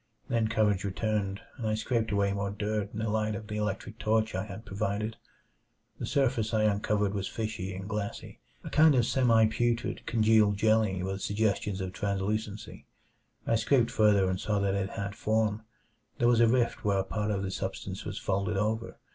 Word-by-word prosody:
Then 115 -2 +2
courage 105 -3 +1
returned, 100 0 -1 0.2
and 115 - -3
I 110 - +1
scraped 110 0 -1
away 100 -1 +1
more 100 0 -2
dirt 105 0 -2
in - - -8
the 110 0 -1
light 110 0 0
of 105 +2 -6
the 105 0 -5
electric 105 +1 -3
torch 110 0 +1
I 95 +2 -2
had 105 +2 -9
provided. 105 +2 -2 0.8
The - - -3
surface 120 -5 +1
I 110 - +3
uncovered 105 -1 +1
was 100 -1 -2
fishy 110 -4 -4
and 95 +1 -6
glassy 105 -1 -5 0.2
a - - -7
kind 155 -1 +6
of 120 -2 +3
semi 115 -4 +4
putrid 120 +2 -1
congealed 110 -3 +4
jelly 110 -4 +2
with 95 +1 -3
suggestions 100 -2 0
of 95 -1 -4
translucency. 105 +1 -3 0.6
I - - +1
scraped 115 +1 +2
further, 105 -3 +4
and 95 0 -1
saw 105 +1 0
that 100 -1 +1
it 100 0 -1
had 100 0 -4
form. 110 0 0 0.5
There 120 - +3
was 120 -1 +4
a 115 - +6
rift 120 0 +1
where 100 -1 +2
a 95 - +1
part 105 +2 -2
of 100 -2 -1
the 95 - -3
substance - - -4
was - - -5
folded 100 +1 -1
over. 110 +3 -1
105 Hz, 190 wpm, -29 LUFS, 100-110 Hz, 0.8 s, kind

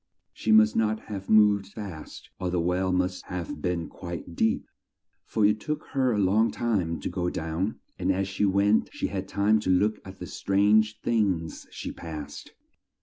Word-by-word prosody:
She 110 - -1
must 110 0 +6
not 110 -1 +1
have 100 -3 -7
moved 105 -2 +5
fast, 100 -6 -9
or 90 - -1
the 90 0 0
well 90 +2 +1
must 90 0 -1
have 90 -4 -5
been 85 -1 -1
quite 85 -1 -8
deep, 110 +4 +1 0.6
for 110 -2 +2
it 105 +1 +3
took 150 +6 -3
her 130 -3 +2
a 110 - 0
long 105 +3 +3
time 95 -9 -1
to - - -3
go 90 -1 -1
down, 85 +6 -3 0.2
and 95 +1 +1
as 95 0 0
she 95 +1 -2
went 100 +2 +3
she - - -3
had 95 -1 -4
time 105 +3 +2
to 105 - -3
look 105 +4 +3
at 95 0 -11
the 90 - -7
strange 105 +4 +2
things 95 -8 0
she - - -6
passed. 75 -3 -8
95 Hz, 180 wpm, -27 LUFS, 90-110 Hz, 0.6 s, must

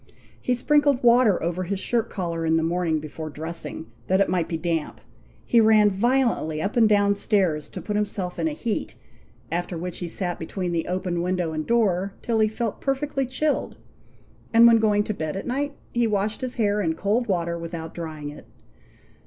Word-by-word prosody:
He 250 - +1
sprinkled 285 0 +2
water 235 -6 +5
over 175 +2 -1
his 190 +2 -2
shirt 230 +2 0
collar 170 -4 -3
in 160 0 +2
the 160 - +1
morning 165 -1 0
before 155 +1 -7
dressing, 160 +2 -6 0.2
that 190 +1 +3
it 200 - +3
might 180 -3 +1
be 165 - -1
damp; 165 -2 -2 0.5
he 235 - +4
ran 215 -1 +5
violently 230 -7 +1
up 195 +6 -2
and 225 -3 +5
down 205 -1 +4
stairs 190 -7 0
to - - -8
put 210 - -3
himself 205 -3 -2
in - - +1
a - - -1
heat, 235 -8 -3 0.6
after 175 +1 -2
which 180 +1 -5
he 175 - -4
sat 175 +1 -3
between 180 +2 -3
the 165 -1 -1
open 180 -1 -2
window 180 -2 -1
and 155 -1 -3
door 200 -4 +1
till 230 -2 0
he 215 - +4
felt 220 0 -3
perfectly 275 -1 -1
chilled; 285 +4 -1 0.7
and 230 0 +7
when 230 -1 +7
going 210 -1 +3
to 215 - -3
bed 155 -2 -4
at - - -5
night, 280 +3 -2 0.2
he 240 -1 +2
washed 210 +2 -1
his 255 -1 -3
hair 210 -3 +1
in 160 -4 0
cold 215 +7 0
water 170 -3 0
without 165 -1 -6
drying 155 -3 -6
it. 145 - -12
195 Hz, 195 wpm, -24 LUFS, 170-230 Hz, 0.7 s, and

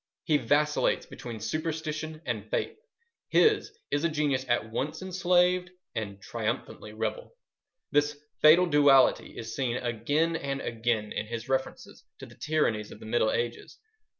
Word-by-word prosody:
He 150 - +3
vacillates 150 +1 +1
between 115 -2 -8
superstition 155 +5 -4
and 110 -3 -3
faith. 445 - -1 0.5
His 430 0 +3
is 145 +1 0
a 170 - +3
genius 145 -4 0
at 120 -2 0
once 150 +9 -3
enslaved 180 0 +2 0.2
and 100 -3 -4
triumphantly 105 +2 -4
rebel. - - -4 0.6
This 145 0 +2 0.2
fatal 165 +4 +7
duality 145 -5 +4
is 115 0 -6
seen 125 -3 -1
again 145 +8 0
and 140 -3 -3
again 115 -3 -1
in 105 - -3
his 115 0 -5
references 135 0 -3
to - - -9
the - - -15
tyrannies 115 -9 0
of - - -11
the - - -11
Middle 110 0 +2
Ages. 120 0 -3
145 Hz, 145 wpm, -28 LUFS, 115-160 Hz, 0.6 s, fatal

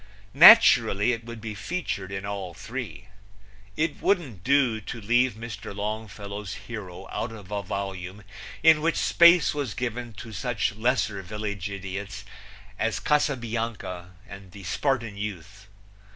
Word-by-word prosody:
Naturally 125 - +8
it 115 -1 -4
would 115 -1 -8
be 110 -1 -6
featured 100 - -4
in 95 0 -4
all 100 -4 -5
three. 115 +3 -7 0.7
It 155 -2 -1
wouldn't 140 - 0
do 130 -3 +2
to 115 +3 -7
leave 120 +4 +2
Mr. 105 -2 -8
Longfellow's 105 -1 -5
hero 95 -5 -8
out 115 - -3
of 105 -3 -11
a 100 -1 -1
volume 95 0 -5 0.4
in 160 -2 +6
which 165 +1 +1
space 170 0 +5
was 140 -8 -3
given 120 0 -4
to 110 +1 -10
such 110 +2 -1
lesser 110 -2 0
village 100 0 -5
idiots 95 0 -6 0.5
as - - 0
Casabianca 115 -10 -2
and 100 -2 -11
the 100 - -11
Spartan 115 - -1
youth. 105 0 -7
110 Hz, 135 wpm, -26 LUFS, 100-125 Hz, 0.7 s, Naturally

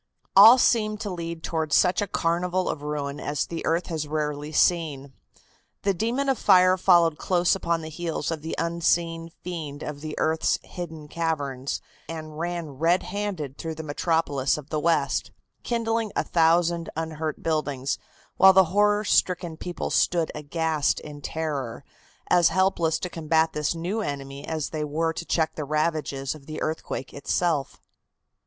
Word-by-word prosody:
All 220 +6 +10
seemed 215 -4 +2
to 205 -3 -3
lead 170 -2 -5
towards 160 -2 0
such 180 +3 +3
a 205 - -1
carnival 180 +1 0
of 145 - -3
ruin 145 -1 -3
as 145 0 -1
the 165 - -5
earth 165 +2 +1
has 155 -3 -3
rarely 150 0 -3
seen. 150 -6 +1 0.7
The 200 - +2
demon 235 +9 -1
of 270 -2 +1
fire 185 0 +6
followed 170 -4 +4
close 180 -1 +2
upon 170 -3 -1
the 155 - -6
heels 165 -1 -3
of 160 -2 -3
the 160 - -4
unseen 165 0 0
fiend 155 -5 -5
of 145 -1 -6
the 155 0 -6
earth's 160 0 +1
hidden 160 -4 -8
caverns, 145 -5 -2 0.3
and 155 -1 -7
ran 170 -2 -3
red 170 +3 +3
handed 180 -9 -4
through 160 -1 -4
the 160 - -6
metropolis 145 -3 0
of 150 -1 -10
the 155 - 0
West, 150 -4 +1 0.3
kindling 225 -2 -1
a - - +1
thousand 170 0 +2
unhurt 160 -1 -4
buildings, 145 -4 -1 0.4
while 190 0 +8
the 190 0 +7
horror 210 +1 +3
stricken 180 -4 +1
people 175 +2 -5
stood 170 -2 +2
aghast 155 0 0
in 145 -1 -9
terror, 145 -7 -4 0.4
as 175 -1 +5
helpless 170 -2 +2
to - - -4
combat 160 -1 +1
this 150 +2 -1
new 180 +7 -2
enemy 140 -4 -5
as 160 -3 -3
they 155 -1 -2
were 160 +2 -1
to 170 - -6
check 160 -2 +1
the 155 - -4
ravages 150 -2 -1
of 150 -3 -14
the 155 - -5
earthquake 155 -4 -4
itself. 145 0 -1
165 Hz, 160 wpm, -25 LUFS, 150-175 Hz, 0.7 s, All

